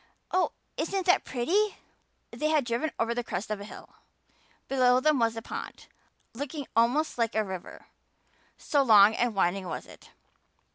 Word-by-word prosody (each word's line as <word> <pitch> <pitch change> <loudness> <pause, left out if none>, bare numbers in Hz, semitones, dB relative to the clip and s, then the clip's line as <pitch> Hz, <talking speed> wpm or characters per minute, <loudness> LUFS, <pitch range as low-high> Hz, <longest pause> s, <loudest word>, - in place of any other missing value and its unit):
Oh, 370 0 +1 0.2
isn't 375 +3 -2
that 360 - +3
pretty!" 380 - 0 0.5
They 305 - -2
had 305 -4 +2
driven 240 +6 -1
over 230 +1 0
the 245 0 -2
crest 200 0 -5
of 210 -1 -3
a - - -7
hill. - - -13 0.7
Below 255 -2 +4
them 300 0 +2
was 230 -1 +1
a 225 - -5
pond, - - -7 0.5
looking 285 +3 -5
almost 245 +5 +2
like 230 -1 0
a 220 - +2
river 190 -3 -8 0.7
so 285 - +1
long 215 -4 +7
and 235 -1 0
winding 190 0 0
was - - -5
it. - - -16
240 Hz, 160 wpm, -28 LUFS, 220-300 Hz, 0.7 s, long